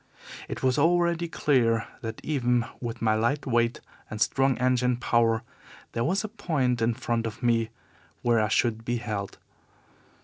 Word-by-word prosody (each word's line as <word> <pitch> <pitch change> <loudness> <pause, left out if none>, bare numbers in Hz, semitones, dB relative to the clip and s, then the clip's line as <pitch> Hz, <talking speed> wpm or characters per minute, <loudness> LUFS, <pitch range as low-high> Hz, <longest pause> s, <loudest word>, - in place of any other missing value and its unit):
It - - -5
was 130 +1 +2
already 170 +1 +2
clear 120 -8 +2
that 115 -1 -6
even 125 -5 +1
with 120 -1 -5
my 110 -1 +3
light 120 +7 0
weight 120 -2 +1 0.3
and 105 - -6
strong 135 +2 +2
engine 125 0 +2
power 115 -1 +2 0.5
there 115 - -1
was 185 - +1
a - - -2
point 150 - -1
in 115 0 +2
front 115 -2 -1
of 115 +3 -8
me 115 -2 +2 0.5
where 120 -1 +3
I 105 - +2
should 115 0 +1
be 120 +1 -1
held. 105 -4 -4
120 Hz, 160 wpm, -27 LUFS, 115-135 Hz, 0.5 s, my